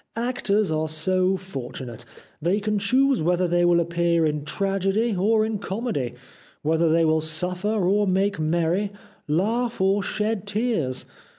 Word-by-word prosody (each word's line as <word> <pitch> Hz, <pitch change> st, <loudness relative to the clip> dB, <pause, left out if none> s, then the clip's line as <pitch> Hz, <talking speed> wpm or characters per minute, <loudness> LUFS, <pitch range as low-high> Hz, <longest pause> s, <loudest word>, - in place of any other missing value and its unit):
Actors 225 Hz, -5 st, 0 dB
are 155 Hz, 0 st, -1 dB
so 185 Hz, +4 st, +1 dB
fortunate. 125 Hz, -, -7 dB, 0.4 s
They 180 Hz, +6 st, +1 dB
can 210 Hz, 0 st, -1 dB
choose 265 Hz, +2 st, +2 dB
whether 180 Hz, +2 st, +2 dB
they 175 Hz, 0 st, +2 dB
will 175 Hz, 0 st, +4 dB
appear 170 Hz, 0 st, +1 dB
in 150 Hz, -1 st, -1 dB
tragedy 195 Hz, +6 st, 0 dB
or 215 Hz, +4 st, +2 dB
in 220 Hz, -2 st, -2 dB
comedy, 190 Hz, -, -3 dB, 0.5 s
whether 160 Hz, +1 st, +2 dB
they 165 Hz, +1 st, +4 dB
wih 160 Hz, 0 st, +2 dB
suffer 180 Hz, +5 st, -3 dB, 0.2 s
or 205 Hz, +2 st, +2 dB
make 195 Hz, +1 st, +1 dB
merry, 170 Hz, +5 st, 0 dB, 0.4 s
laugh 225 Hz, +10 st, 0 dB
or 195 Hz, +2 st, +2 dB
shed 210 Hz, +1 st, -2 dB
tears. 205 Hz, -, -1 dB
185 Hz, 140 wpm, -24 LUFS, 160-210 Hz, 0.5 s, will